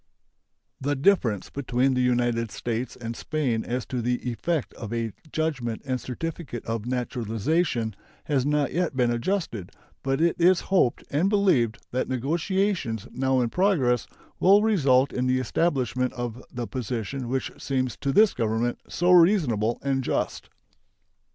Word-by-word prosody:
The 145 Hz, +2 st, 0 dB
difference 130 Hz, -, +2 dB
between 130 Hz, -1 st, +1 dB
the 125 Hz, -, +1 dB
United 120 Hz, -2 st, +1 dB
States 120 Hz, +4 st, -3 dB
and 115 Hz, -1 st, -6 dB
Spain 130 Hz, -8 st, -1 dB
as 125 Hz, +1 st, -3 dB
to 125 Hz, -2 st, -3 dB
the 125 Hz, +1 st, -1 dB
effect 150 Hz, +6 st, -2 dB
of 110 Hz, -2 st, -8 dB
a 115 Hz, -1 st, -2 dB, 0.2 s
judgment 135 Hz, -8 st, -2 dB
and 130 Hz, -2 st, -2 dB
certificate 140 Hz, -2 st, -5 dB
of 115 Hz, 0 st, -3 dB
naturalization 120 Hz, -, -1 dB, 0.3 s
has 140 Hz, -4 st, +1 dB
not 145 Hz, 0 st, +1 dB
yet 170 Hz, -5 st, -1 dB
been 120 Hz, -2 st, +3 dB
adjusted, 120 Hz, -, -2 dB, 0.3 s
but 135 Hz, +1 st, 0 dB
it 170 Hz, +1 st, +3 dB
is 175 Hz, +1 st, +5 dB
hoped 130 Hz, -11 st, +3 dB
and 160 Hz, +7 st, +2 dB
believed 185 Hz, -, +2 dB
that 130 Hz, +1 st, -1 dB
negotiations 155 Hz, -, -1 dB
now 130 Hz, 0 st, +1 dB
in 120 Hz, -, 0 dB
progress 155 Hz, -, +2 dB, 0.3 s
will 200 Hz, +3 st, +6 dB
result 140 Hz, -11 st, +3 dB
in 125 Hz, 0 st, 0 dB
the 130 Hz, 0 st, +2 dB
establishment 130 Hz, -2 st, 0 dB
of 120 Hz, 0 st, -5 dB
the 120 Hz, -2 st, -4 dB
position 125 Hz, +1 st, -4 dB
which 130 Hz, +1 st, -1 dB
seems 130 Hz, -3 st, -1 dB
to 140 Hz, -, -1 dB
this 210 Hz, +7 st, +5 dB
Government 115 Hz, +1 st, -1 dB
so 175 Hz, +1 st, +2 dB
reasonable 155 Hz, -, +4 dB
and 135 Hz, -1 st, 0 dB
just. -, -, -2 dB
130 Hz, 145 wpm, -26 LUFS, 120-155 Hz, 0.3 s, will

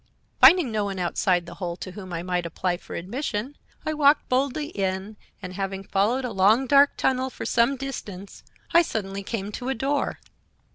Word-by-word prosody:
"Finding 340 Hz, -9 st, +7 dB
no 210 Hz, -2 st, 0 dB
one 195 Hz, -1 st, -4 dB
outside 175 Hz, 0 st, +1 dB
the 170 Hz, -, -9 dB
hole 175 Hz, -2 st, -2 dB
to 185 Hz, -, -8 dB
whom 185 Hz, -1 st, -9 dB
I 170 Hz, 0 st, -3 dB
might 180 Hz, -1 st, -1 dB
apply 175 Hz, +2 st, -2 dB
for -, -, -10 dB
admission 235 Hz, -, -4 dB, 0.3 s
I 310 Hz, -, 0 dB
walked 295 Hz, -1 st, +4 dB
boldly 280 Hz, +3 st, 0 dB
in, 195 Hz, -, -3 dB, 0.3 s
and 185 Hz, 0 st, -6 dB
having 195 Hz, 0 st, -4 dB
followed 215 Hz, +7 st, +1 dB
a 245 Hz, -, -3 dB
long, 210 Hz, +6 st, +4 dB
dark 280 Hz, +2 st, +5 dB
tunnel 260 Hz, 0 st, +1 dB
for -, -, -7 dB
some 235 Hz, +4 st, +2 dB
distance, 205 Hz, -8 st, -7 dB, 0.3 s
I 340 Hz, -, +8 dB
suddenly 200 Hz, -, -3 dB
came 205 Hz, 0 st, -4 dB
to 250 Hz, +4 st, -5 dB
a 265 Hz, -, 0 dB
door. 275 Hz, +4 st, -1 dB
210 Hz, 185 wpm, -25 LUFS, 190-265 Hz, 0.3 s, I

